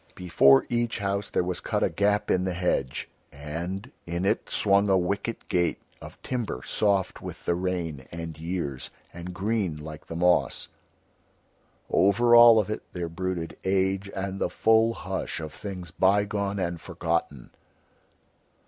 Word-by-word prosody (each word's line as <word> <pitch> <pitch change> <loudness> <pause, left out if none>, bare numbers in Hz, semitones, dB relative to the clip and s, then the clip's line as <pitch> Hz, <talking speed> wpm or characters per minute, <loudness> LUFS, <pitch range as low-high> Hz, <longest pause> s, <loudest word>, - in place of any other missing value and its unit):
Before 85 -7 +5
each 120 -1 -1
house 100 -1 -2
there - - +1
was 90 0 -3
cut - - -1
a - - +3
gap 105 +1 +1
in 90 - +2
the 95 -1 -2
hedge, 85 -7 -1 0.2
and 85 - -6 0.2
in 85 +2 -2
it 105 +3 0
swung 100 0 +2
a 95 - +5
wicket 100 +5 -2
gate 85 -1 +1 0.2
of - - -11
timber 115 - -3
soft 100 -3 0
with - - -9
the - - +2
rain 85 -6 -3
and 85 -1 -6
years, 80 -6 -4 0.2
and 85 +1 -7
green 95 -3 -1
like 75 0 -9
the 80 - -6
moss. 90 +1 +2 1.2
Over 120 +5 +4
all 120 -1 +9
of 105 -1 +1
it - - -3
there 85 -2 -3
brooded 85 0 -4
age 95 +1 0
and 95 0 -3
the - - +1
full 110 +1 +3
hush 95 -2 -4
of 80 -1 -7
things 90 -5 -7
bygone 100 +2 +1
and 85 -3 -2
forgotten. 80 -6 -3
95 Hz, 150 wpm, -26 LUFS, 85-100 Hz, 1.2 s, all